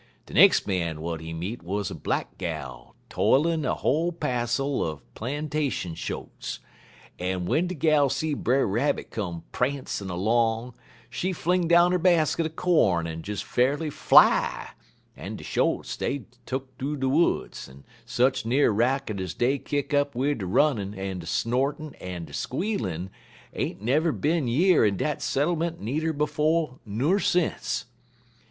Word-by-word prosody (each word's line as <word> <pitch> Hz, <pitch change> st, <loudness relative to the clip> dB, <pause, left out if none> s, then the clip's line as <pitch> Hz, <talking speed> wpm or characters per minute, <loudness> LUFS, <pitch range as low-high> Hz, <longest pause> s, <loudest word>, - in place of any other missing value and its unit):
De -, -, -13 dB
nex' -, -, +6 dB
man 85 Hz, -4 st, -1 dB
w'at 80 Hz, +1 st, -4 dB
he 80 Hz, 0 st, -7 dB
meet 90 Hz, +9 st, -5 dB
wuz 100 Hz, +4 st, -2 dB
a -, -, -4 dB
black -, -, -3 dB
gal 75 Hz, -8 st, -6 dB
tollin' 160 Hz, +3 st, +2 dB
a 130 Hz, -, 0 dB
whole 165 Hz, +5 st, +1 dB
passel 130 Hz, -2 st, -1 dB
er 80 Hz, -2 st, -3 dB, 0.2 s
plantation 145 Hz, -, -2 dB
shotes, -, -, -6 dB, 0.6 s
en 90 Hz, 0 st, -2 dB
w'en 165 Hz, -, +1 dB
de 185 Hz, -, -4 dB
gal 150 Hz, -2 st, +3 dB
see 150 Hz, +3 st, -1 dB
Brer 135 Hz, -1 st, +1 dB
Rabbit 120 Hz, +9 st, -1 dB
come 85 Hz, -6 st, -4 dB
prancin' 130 Hz, -6 st, -2 dB
'long, 115 Hz, +6 st, 0 dB, 0.3 s
she 180 Hz, +10 st, -2 dB
fling 180 Hz, 0 st, 0 dB
down 175 Hz, +1 st, +5 dB
'er 180 Hz, -, +2 dB
basket 165 Hz, -2 st, +3 dB
er -, -, -7 dB
corn 155 Hz, -, +2 dB
en 80 Hz, 0 st, -5 dB
des 105 Hz, +4 st, -5 dB
fa'rly 145 Hz, +5 st, 0 dB
fly, -, -, +4 dB, 0.4 s
en -, -, -7 dB
de -, -, -9 dB
shotes, -, -, 0 dB
dey 140 Hz, -2 st, -2 dB, 0.2 s
tuck 130 Hz, +1 st, -2 dB
thoo 145 Hz, +3 st, -2 dB
de 135 Hz, -1 st, -1 dB
woods, 150 Hz, -, 0 dB
en 70 Hz, +1 st, -15 dB, 0.2 s
sech 130 Hz, +2 st, +1 dB
n'er 120 Hz, +1 st, +3 dB
racket 115 Hz, -2 st, 0 dB
ez 90 Hz, -4 st, -5 dB
dey 135 Hz, +3 st, +1 dB
kick 145 Hz, +1 st, -3 dB
up 145 Hz, -1 st, +1 dB
wid 140 Hz, +1 st, 0 dB
der 95 Hz, -, -4 dB
runnin', 105 Hz, -3 st, +1 dB
en 95 Hz, -1 st, -4 dB
der 80 Hz, -, -9 dB
snortin', 135 Hz, -, -1 dB
en 90 Hz, -2 st, -6 dB
der 70 Hz, -, -14 dB
squealin' 105 Hz, -, -3 dB, 0.4 s
ain't -, -, -3 dB
never 150 Hz, +8 st, +2 dB
bin 150 Hz, -1 st, 0 dB
year 165 Hz, +7 st, +4 dB
in 100 Hz, -3 st, +2 dB
dat 150 Hz, +6 st, -2 dB
settlement 165 Hz, +3 st, 0 dB
needer 155 Hz, +9 st, -1 dB
befo' 150 Hz, -1 st, 0 dB
ner 135 Hz, -, +1 dB
since. 180 Hz, -3 st, 0 dB
130 Hz, 155 wpm, -26 LUFS, 100-155 Hz, 0.6 s, nex